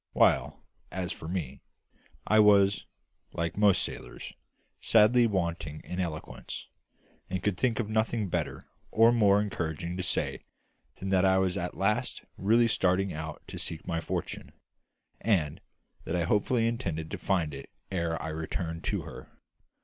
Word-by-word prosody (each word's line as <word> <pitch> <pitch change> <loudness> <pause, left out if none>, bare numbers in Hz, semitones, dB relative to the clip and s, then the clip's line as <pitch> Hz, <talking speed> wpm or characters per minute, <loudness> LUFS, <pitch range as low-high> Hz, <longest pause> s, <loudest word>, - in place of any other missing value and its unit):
While, - - +3 0.3
as 90 -2 -3
for 80 - -7
me, 75 -7 -4 0.6
I 110 - +4
was 100 -1 +5 0.5
like 85 0 -2
most 105 -2 +4
sailors - - -7 0.5
sadly 115 +2 +5
wanting 85 -6 -2
in 90 - -5
eloquence, 80 -4 -5 0.6
and 95 -1 -3
could 105 -3 +1
think 120 +5 0
of 115 - 0
nothing 110 0 0
better - - -3 0.2
or 115 +1 +6
more 105 -4 +5
encouraging 85 -4 -3
to - - -1
say 90 - -1 0.5
than 95 - -5
that 95 -1 +3
I 95 0 +5
was 95 -1 +1
at 90 - -3
last 105 +6 0
really 115 +4 +4
starting 95 -3 +1
out 80 0 -6
to - - -8
seek 80 -1 -5
my 85 -1 -1
fortune, - - -4 0.7
and 85 -9 +1 0.4
that 80 - -2
I 85 -1 +1
fully 115 +2 +1
intended 85 -10 -3
to - - -4
find 85 -7 0
it 70 - -8 0.2
ere 85 -3 -1
I 80 - -4
returned 80 +1 -4
to - - -1
her. - - -10
95 Hz, 150 wpm, -29 LUFS, 80-105 Hz, 0.7 s, or